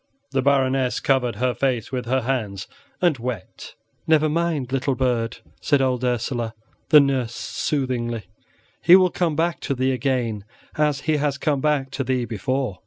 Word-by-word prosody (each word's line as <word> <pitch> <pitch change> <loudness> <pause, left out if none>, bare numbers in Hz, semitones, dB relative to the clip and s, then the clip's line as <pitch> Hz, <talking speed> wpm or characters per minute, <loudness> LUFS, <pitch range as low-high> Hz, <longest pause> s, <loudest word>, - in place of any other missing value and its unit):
The 135 -1 +1
Baroness 135 -2 +2
covered 125 -4 +1
her 125 +3 0
face 125 -5 -1
with 125 -2 -3
her 130 +2 +1
hands 110 -6 -2 0.4
and 160 -7 +3
wept. 115 -6 -6 0.3
"Never 155 -1 +4
mind, 155 -5 -1
little 135 0 0
bird," 120 -3 0 0.2
said 140 +8 +2
old 130 -2 0
Ursela, 120 -1 -1 0.3
the 150 - +9
nurse, 130 -4 +1
soothingly; 120 -6 -2 0.6
"he 175 - +8
will 185 -1 +5
come 170 -4 0
back 165 +1 0
to 140 - -2
thee 130 +1 +1
again 125 -5 -1 0.3
as 150 -2 +1
he 155 0 +1
has 145 -1 0
come 140 -2 0
back 145 -3 0
to 135 0 -2
thee 125 -1 0
before." 120 -1 -2
130 Hz, 165 wpm, -23 LUFS, 120-140 Hz, 0.6 s, the